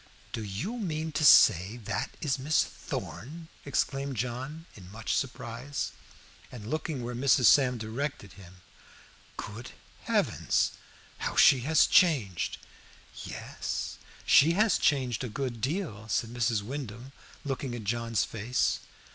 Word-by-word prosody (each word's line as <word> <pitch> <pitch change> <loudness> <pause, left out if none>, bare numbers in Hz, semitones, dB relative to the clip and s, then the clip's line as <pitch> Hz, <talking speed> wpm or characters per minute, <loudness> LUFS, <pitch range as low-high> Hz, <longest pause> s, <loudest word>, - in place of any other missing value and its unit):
"Do 110 - -3
you 125 - -4
mean 160 -5 -3
to 150 - -1
say 105 - +6
that 110 - -3
is 140 -3 0
Miss 150 +4 +2
Thorn?" 160 +5 -7 0.2
exclaimed 140 -1 -1
John 130 +8 -4
in 90 -3 -13
much 110 +1 -3
surprise, 130 +1 -3 0.6
and 115 -5 -9
looking 155 0 -3
where 120 +1 -4
Mrs. 125 0 +3
Sam 125 +1 +5
directed 110 -2 -4
him. 95 -2 -15 0.8
"Good 110 +3 -7 0.3
Heavens! - - +1 0.5
How - - -3
she 135 - +7
has 160 - +6
changed!" 130 - +2 0.7
"Yes, - - -5 0.3
she 160 +4 +6
has 210 +1 +3
changed 130 -4 +1
a 125 - -3
good 120 0 -4
deal," 135 - -3
said 115 +2 0
Mrs. 115 -3 0
Wyndham, 125 0 -7 0.3
looking 135 -2 -3
at 115 - -6
John's 115 0 0
face. 115 +4 -1
125 Hz, 130 wpm, -29 LUFS, 110-145 Hz, 0.8 s, she